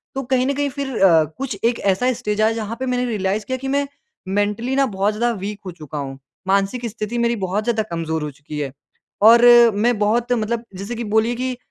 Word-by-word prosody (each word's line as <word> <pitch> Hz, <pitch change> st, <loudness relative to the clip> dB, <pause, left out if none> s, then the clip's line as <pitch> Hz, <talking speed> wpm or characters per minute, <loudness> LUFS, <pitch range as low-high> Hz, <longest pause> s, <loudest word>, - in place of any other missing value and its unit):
तो 270 Hz, -, -1 dB
कहीं 255 Hz, 0 st, +3 dB
न 280 Hz, -, +1 dB
कहीं 285 Hz, 0 st, -1 dB
फिर 275 Hz, -2 st, -5 dB
अ, 165 Hz, -4 st, +6 dB
कुछ 260 Hz, -6 st, -4 dB
एक 230 Hz, 0 st, +1 dB
ऐसा 200 Hz, +6 st, +1 dB
स्टेज 215 Hz, -3 st, -2 dB
आया 220 Hz, +1 st, +4 dB
जहाँ 225 Hz, 0 st, -4 dB
पे 260 Hz, -, -2 dB
मैंने 250 Hz, 0 st, 0 dB
रियलाइज़ 205 Hz, -2 st, -1 dB
किया 260 Hz, 0 st, -2 dB
कि 270 Hz, +1 st, -6 dB
मैं 280 Hz, +1 st, 0 dB, 0.4 s
मेंटली 205 Hz, +6 st, -1 dB
ना 275 Hz, 0 st, +3 dB
बहुत 205 Hz, -2 st, 0 dB
ज़्यादा 235 Hz, +3 st, 0 dB
वीक 205 Hz, +2 st, -5 dB
हो 185 Hz, -, -5 dB
चुका 155 Hz, -3 st, -9 dB
हूँ। 135 Hz, -1 st, -5 dB, 0.3 s
मानसिक 200 Hz, +5 st, +1 dB
स्थिति 220 Hz, +2 st, -5 dB
मेरी 235 Hz, 0 st, +1 dB
बहुत 195 Hz, +3 st, -1 dB
ज़्यादा 225 Hz, -1 st, 0 dB
कमज़ोर 160 Hz, -2 st, -2 dB
हो 150 Hz, -, -4 dB
चुकी 145 Hz, +2 st, -8 dB
है। 140 Hz, -3 st, -3 dB, 0.5 s
और 230 Hz, +2 st, +8 dB, 0.3 s
मैं 230 Hz, +2 st, +2 dB
बहुत 235 Hz, +4 st, +1 dB
मतलब 230 Hz, 0 st, -1 dB
जैसे 200 Hz, +6 st, -5 dB
कि 235 Hz, -, -4 dB
बोलिए 220 Hz, +2 st, +1 dB
कि 255 Hz, 0 st, -3 dB
220 Hz, 220 wpm, -20 LUFS, 195-245 Hz, 0.5 s, और